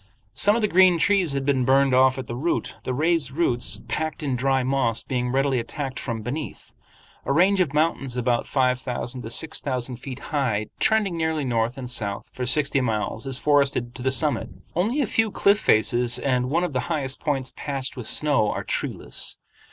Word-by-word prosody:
Some 205 +1 +3
of 230 - -1
the - - +4
green 185 -2 +5
trees 180 -1 +2
had 135 -1 -2
been 135 -2 +2
burned 135 +1 +3
off 130 0 +4
at 130 - -5
the - - -6
root, 150 +8 -2
the - - -2
raised 155 +1 +1
roots, 130 -5 +1
packed 155 0 -3
in 135 -3 -1
dry 135 +1 +1
moss, 125 -4 0
being 125 -2 -2
readily 135 -1 +1
attacked 135 +2 -5
from 115 -3 -4
beneath. 140 +6 -6 0.5
A - - -2
range 185 +6 +4
of 160 -6 +1
mountains 145 -4 0
about 120 -1 0
five 125 -2 +1
thousand 125 0 -3
to 110 - -7
six 160 +7 -1
thousand 125 -2 -3
feet 130 0 -8 0.2
high 115 -8 0
trending 215 -5 +2
nearly 160 -3 -1
north 120 0 -1
and 130 -2 -6
south 105 -5 -3
for 125 -1 -4
sixty 140 0 +2
miles 110 +1 -2
is 135 -1 0
forested 140 -4 +1
to 125 - -9
the 130 +1 +1
summit. 140 +3 -1 0.3
Only 220 - +1
a - - +2
few 225 +1 +1
cliff 200 0 +3
faces 120 - +2
and 125 -1 0
one 165 +5 +1
of 175 - -2
the 130 - 0
highest 140 -5 -2
points 135 -4 -2
patched 135 -2 -4
with 125 -4 -6
snow 145 -9 +3
are - - -3
treeless. - - -2
135 Hz, 200 wpm, -24 LUFS, 125-155 Hz, 0.5 s, green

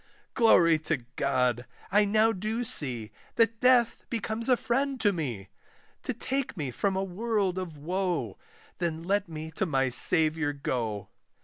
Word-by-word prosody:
Glory 170 -9 +5
to 150 -5 -2
God! 125 -3 0 0.2
I 205 +1 +4
now 215 +2 +3
do 220 +4 -3
see, 125 - -1 0.2
That 230 -1 +2
death 250 -2 +3
becomes 230 +1 -2
a 250 - +5
friend 270 +3 -1
to 205 -2 +2
me, 120 - -5 0.5
To - - -3
take 255 0 -3
me 140 -5 -3
from 195 +10 -1
a 190 - -1
world 195 -1 -1
of 170 -5 -7
woe; 170 - -2 0.4
Then 165 -2 -2
let 200 +1 0
me 160 0 -7
to 190 +4 -2
my 135 -3 +1
Saviour 155 +2 +4
go! 115 -7 -3
180 Hz, 150 wpm, -28 LUFS, 145-220 Hz, 0.5 s, Glory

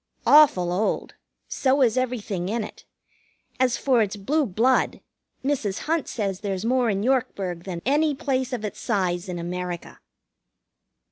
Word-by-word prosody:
Awful 265 - +6
old; 210 +4 -1 0.3
so 270 +1 +2
is 230 -3 +3
everything 225 -8 -2
in 225 +1 -1
it. - - -10 0.7
As 255 -2 +2
for 255 -4 +3
its 210 -1 -1
blue 275 +9 0
blood, 230 +7 +2 0.5
Mrs. 240 -9 -1
Hunt 320 -1 -1
says 195 -4 -3
there's 195 -1 -3
more 250 0 +2
in 200 -1 0
Yorkburg 200 -9 -1
than 175 -3 -5
any 295 +3 +2
place 260 -1 -1
of 235 -4 -3
its 210 - -6
size 185 -5 -1
in 180 - -3
America. 175 0 -5
220 Hz, 145 wpm, -24 LUFS, 190-260 Hz, 0.7 s, Awful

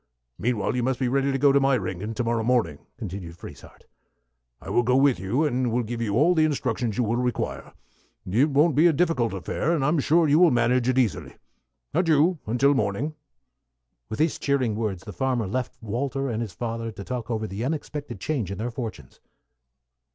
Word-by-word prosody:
Meanwhile, 120 -1 0
you 125 - 0
must 130 0 -1
be 130 - +1
ready 135 +2 +1
to 135 - 0
go 140 +1 +5
to 140 - +4
Meyringen 110 -6 -1
to 125 - -1
morrow 115 0 0
morning," 110 - +1 0.2
continued 90 -2 -7
Frieshardt. - - -13 0.7
"I - - -8
will - - +3
go 125 +2 +2
with 135 -5 +4
you, 115 - 0
and 125 -3 0
give 115 +1 -4
you 105 -3 -1
all 155 +9 +4
the 160 -2 +3
instructions 125 -7 -1
you 125 - +2
will 115 +1 0
require. 125 0 -3 0.5
It 120 +11 +2
won't 150 +3 +3
be 160 +4 +6
a 165 - +4
difficult 150 -7 +1
affair, 135 - -1
and 140 -4 0
I'm 150 +2 +2
sure 160 +4 +3
you 150 +2 +4
will 180 -1 +7
manage 120 0 +2
it 130 - +1
easily. 120 -6 0 0.6
Adieu, 165 0 +3 0.2
till 140 +3 +4
morning." 120 +5 -1 1.0
With 110 - -4
these 160 +3 +1
cheering 135 -5 +1
words 105 -5 -3
the 105 - -8
farmer 125 +3 0
left 125 +6 -3
Walter 135 +5 -2
and 115 -1 -2
his 110 -6 -5
father 115 +1 -4
to 100 - -9
talk 125 +1 -5
over 110 -2 -1
the 105 +2 -5
unexpected 145 -4 -4
change 120 - -2
in 100 - -5
their 120 +3 -3
fortunes. 110 - -7
125 Hz, 195 wpm, -25 LUFS, 110-140 Hz, 1.0 s, will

